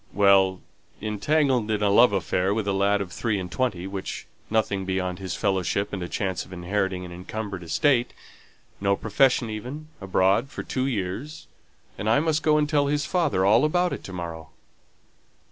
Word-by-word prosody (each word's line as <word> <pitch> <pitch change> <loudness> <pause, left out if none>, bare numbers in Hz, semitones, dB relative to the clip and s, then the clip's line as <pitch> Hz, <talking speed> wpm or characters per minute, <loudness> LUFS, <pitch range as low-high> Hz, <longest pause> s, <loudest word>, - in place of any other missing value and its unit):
"Well, 95 -2 +4 0.4
entangled 120 +3 +1
in 105 -1 0
a 100 - +3
love 110 +3 +6
affair 95 +1 0
with 110 -2 -2
a 100 - +1
lad 100 +1 +2
of 95 -2 -5
three 110 -1 -1
and 90 -2 -6
twenty, 120 -9 -1
with 95 0 -5 0.2
nothing 105 -3 0
beyond 95 -1 -2
his 95 -2 -4
fellowship 95 +1 0
and 95 - -3
a 90 - -4
chance 95 -5 -2
of - - -16
inheriting 95 +1 -2
an 90 - -9
encumbered 95 +2 -6
estate; 120 - +2 0.7
no 100 0 +2
profession 115 +2 +2
even, 130 +8 -7
abroad 95 +6 +2
for - - -6
two 130 0 -2
years, 115 +6 -4 0.5
and 105 - -1
I 115 - +4
must 155 0 +1
go 155 -1 +3
and 150 -1 +2
tell 145 -2 +2
his 145 0 0
father 150 - +1
all 110 +6 +5
about 175 +4 +2
it - - -6
to - - -8
morrow." 85 -2 -6
100 Hz, 180 wpm, -25 LUFS, 95-130 Hz, 0.7 s, love